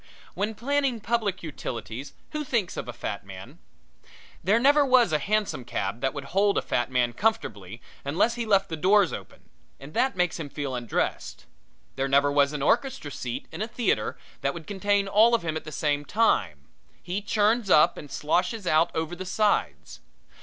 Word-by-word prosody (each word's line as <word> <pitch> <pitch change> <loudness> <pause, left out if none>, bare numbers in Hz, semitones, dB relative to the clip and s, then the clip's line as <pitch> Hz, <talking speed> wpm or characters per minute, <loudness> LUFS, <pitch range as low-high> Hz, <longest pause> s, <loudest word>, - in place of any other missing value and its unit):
When 215 +2 -2
planning 275 0 0
public 210 -3 -1
utilities, 130 -4 -6 0.2
who 305 -1 -3
thinks 235 -10 -1
of - - -5
a - - -4
fat 110 -3 -5
man? 95 -1 -11 0.8
There 200 +6 +4
never 285 +4 +5
was 255 - +4
a 150 - +3
hansom 205 -5 -1
cab 115 -4 -3
made - - -20
that 135 +2 -1
would 140 - -4
hold 200 +7 +1
a - - +1
fat 120 - -1
man 125 -2 +1
comfortably 115 - -2 0.2
unless 175 +12 +1
he 240 0 -3
left 195 -2 +3
the 160 - -3
doors 190 +3 +3
open, - - -10 0.3
and 140 +3 -11
that 265 0 +1
makes 180 -2 0
him 150 -3 -5
feel 140 -1 -4
undressed. 120 -3 -3 0.5
There 135 0 0
never 140 +1 +3
was 140 0 +3
an 145 -2 -3
orchestra 265 - 0
seat 120 -3 -5
in - - -6
a 215 - -1
theater 235 +1 -1 0.2
that - - -1
would 165 -2 -8
contain 200 +1 0
all 220 +4 +5
of 230 - -2
him 160 -2 -2
at 160 - -5
the 155 - -7
same 145 -1 0
time 95 - +1 0.4
he 185 +4 -3
churns 210 +1 +1
up 150 - +6
and 145 - -10
sloshes 180 - -1
out 160 0 +3
over 160 +2 -2
the 185 - -6
sides. 210 +2 0
175 Hz, 190 wpm, -26 LUFS, 140-215 Hz, 0.8 s, up